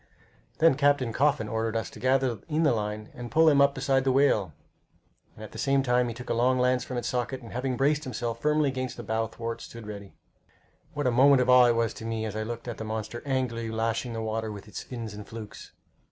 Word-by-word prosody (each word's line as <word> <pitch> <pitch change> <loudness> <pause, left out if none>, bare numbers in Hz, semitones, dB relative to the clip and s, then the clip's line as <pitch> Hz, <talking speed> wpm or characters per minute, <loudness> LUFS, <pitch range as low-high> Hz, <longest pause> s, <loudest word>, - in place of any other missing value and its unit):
Then 165 -1 +5
Captain 140 -4 +2
Coffin 140 -4 +2
ordered 110 +1 -2
us 110 - -2
to - - -12
gather 130 -2 +1
in 155 +1 +1
the 145 - +4
line 105 -1 -3
and 120 0 -7
pull 160 +3 +4
him 145 -3 +6
up 140 0 +4
beside 135 -2 +1
the 135 - +2
whale, 130 - +3 0.8
and 110 - -10
at 110 - -9
the - - -9
same 135 -1 +2
time 125 -1 +2
he 115 - -5
took 125 +1 -6
a - - +3
long 125 +2 +2
lance 125 0 +2
from 125 - -5
its 120 - -2
socket 125 +1 -2
and 115 - -10
having 125 +1 -2
braced 145 +3 +2
himself 120 -4 -4
firmly 150 0 +2
against 130 -2 -3
the 120 - -6
bow 110 +1 -1
thwart, 115 +1 -6
stood 115 -2 -10
ready. 100 -2 -9 0.8
What 145 -1 -2
a 125 - +3
moment 135 +3 +6
of 125 - +2
awe 125 -1 +8
it 120 - +3
was 115 -1 0
to 115 - -9
me 115 -1 -2
as 105 -1 -5
I 110 - -2
looked 115 +2 -5
at 120 - -5
the - - -4
monster 110 +1 -4
angrily 125 -4 -1
lashing 115 +2 -2
the 115 0 -3
water 110 0 -2
with 100 0 -9
its 105 - -7
fins 115 -4 -7
and 105 0 -9
flukes! 110 -2 -9
120 Hz, 240 wpm, -27 LUFS, 110-135 Hz, 0.8 s, awe